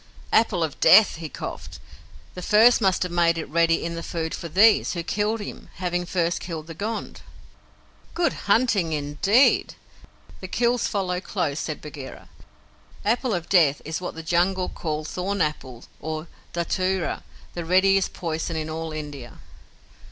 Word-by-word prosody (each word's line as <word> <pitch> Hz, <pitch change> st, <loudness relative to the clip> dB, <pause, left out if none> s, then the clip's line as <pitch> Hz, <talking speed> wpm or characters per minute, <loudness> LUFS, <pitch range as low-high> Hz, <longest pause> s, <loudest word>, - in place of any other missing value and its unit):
"Apple 210 Hz, -6 st, +3 dB
of 155 Hz, -3 st, -4 dB
Death," 215 Hz, -5 st, +6 dB
he 160 Hz, -2 st, -6 dB
coughed. -, -, -7 dB, 0.6 s
"The 180 Hz, -, -7 dB
first 225 Hz, +6 st, +5 dB
must 190 Hz, -3 st, +2 dB
have 180 Hz, -, -4 dB
made 170 Hz, -1 st, +2 dB
it 160 Hz, -, -4 dB
ready 165 Hz, +2 st, +2 dB
in 170 Hz, -, -3 dB
the 165 Hz, -, -5 dB
food 165 Hz, -1 st, -4 dB
for 170 Hz, -, -6 dB
THESE, 205 Hz, +7 st, +5 dB
who 170 Hz, -2 st, -3 dB
killed 210 Hz, +4 st, -1 dB
him, 205 Hz, -, -8 dB
having 175 Hz, 0 st, -2 dB
first 175 Hz, -1 st, 0 dB
killed 165 Hz, -3 st, -6 dB
the 165 Hz, -, -8 dB
Gond." 215 Hz, +7 st, -5 dB, 0.9 s
"Good 345 Hz, -, +1 dB, 0.2 s
hunting, 200 Hz, -7 st, +3 dB
indeed! 150 Hz, -, +2 dB, 0.6 s
The 185 Hz, -, -7 dB
kills 240 Hz, +4 st, +1 dB
follow 185 Hz, -3 st, -1 dB
close," 160 Hz, -8 st, -2 dB
said 155 Hz, -, -4 dB
Bagheera. 145 Hz, -3 st, -9 dB, 0.8 s
"Apple 235 Hz, +1 st, +1 dB
of 175 Hz, -1 st, -4 dB
Death" 155 Hz, -7 st, +4 dB
is 160 Hz, +3 st, -4 dB
what 180 Hz, -, -5 dB
the 165 Hz, -, -7 dB
Jungle 180 Hz, +3 st, +1 dB
call 155 Hz, -2 st, -4 dB
thorn 190 Hz, +5 st, -3 dB
apple 130 Hz, -6 st, -3 dB, 0.2 s
or 155 Hz, +1 st, -4 dB, 0.3 s
dhatura, 185 Hz, +1 st, -1 dB, 0.3 s
the 175 Hz, -, -4 dB
readiest 190 Hz, +3 st, +3 dB
poison 165 Hz, -1 st, -3 dB
in 155 Hz, 0 st, -3 dB
all 160 Hz, 0 st, -4 dB
India. 145 Hz, -5 st, -7 dB
175 Hz, 155 wpm, -24 LUFS, 160-195 Hz, 0.9 s, Death